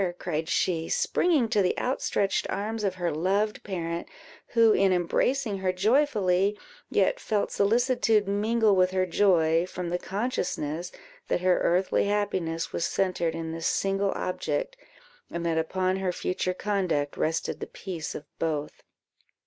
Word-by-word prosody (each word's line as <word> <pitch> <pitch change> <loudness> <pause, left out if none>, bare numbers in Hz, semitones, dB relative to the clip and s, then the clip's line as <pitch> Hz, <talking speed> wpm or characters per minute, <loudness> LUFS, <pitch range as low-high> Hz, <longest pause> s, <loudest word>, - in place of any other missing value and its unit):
cried 160 -3 -3
she, 165 -3 0
springing 310 -10 +2
to 215 -2 +2
the 180 - +1
outstretched 205 -6 0
arms 215 +2 -3
of 195 -2 0
her 175 -2 -1
loved 195 +7 0
parent, 170 -3 -4 0.5
who, 230 -2 +6
in 195 0 +3
embracing 200 +5 +1
her 190 -1 +1
joyfully, 205 -2 +2 0.3
yet - - +2
felt 215 - -1
solicitude 225 -1 +2
mingle 215 +1 +2
with 185 -1 +4
her 185 0 +1
joy, 170 -3 +3
from 180 -1 -5
the 175 +1 -1
consciousness 180 - -3 0.4
that - - 0
her 185 0 +3
earthly 185 +3 +2
happiness 190 -5 -1
was - - -1
centred 175 -3 0
in 165 -1 -4
this 165 0 -2
single 195 0 +1
object, - - -2 0.5
and 170 0 -4
that 165 -1 +1
upon 185 +3 0
her 190 -1 -1
future 180 +1 -2
conduct 185 -9 -1
rested 160 +1 -1
the - - -5
peace 175 -5 -6
of 150 - -7
both. 150 -3 -2
185 Hz, 145 wpm, -27 LUFS, 170-210 Hz, 0.5 s, who